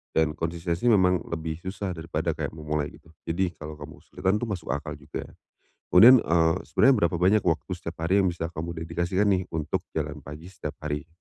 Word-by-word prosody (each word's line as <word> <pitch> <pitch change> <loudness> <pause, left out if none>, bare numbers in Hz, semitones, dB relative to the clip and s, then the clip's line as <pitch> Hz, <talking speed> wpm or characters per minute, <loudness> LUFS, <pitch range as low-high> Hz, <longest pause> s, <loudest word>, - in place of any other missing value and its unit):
dan 80 -1 +2
konsistensi 85 +4 -2
memang 90 -4 +4
lebih 80 -1 -3
susah 95 0 -4
daripada 80 0 -2
kayak - - -4
memulai 75 -1 -2
gitu, 80 - -18 0.2
jadi 90 +1 0
kalau 75 0 -8
kamu 75 - -11
kesulitan 95 +3 -1
tuh 120 - -2
masuk 90 -8 -5
akal 75 +1 -4
juga. 75 +1 -7 0.7
Kemudian, 120 +8 +9
eee, 80 -4 +3
sebenernya 130 -10 +4
berapa 85 - -4
banyak 95 +4 +3
waktu 80 +3 0
setiap 85 -1 -7
hari 95 +4 +3
yang 95 - +3
bisa 85 -1 -3
kamu 85 +1 -5
dedikasikan 85 +4 -1
nih 95 -1 +2
untuk 75 -1 -2
jalan 75 -1 -3
pagi 75 +5 -10
setiap 75 -6 -6
hari? 75 -1 -3
85 Hz, 185 wpm, -26 LUFS, 75-95 Hz, 0.7 s, Kemudian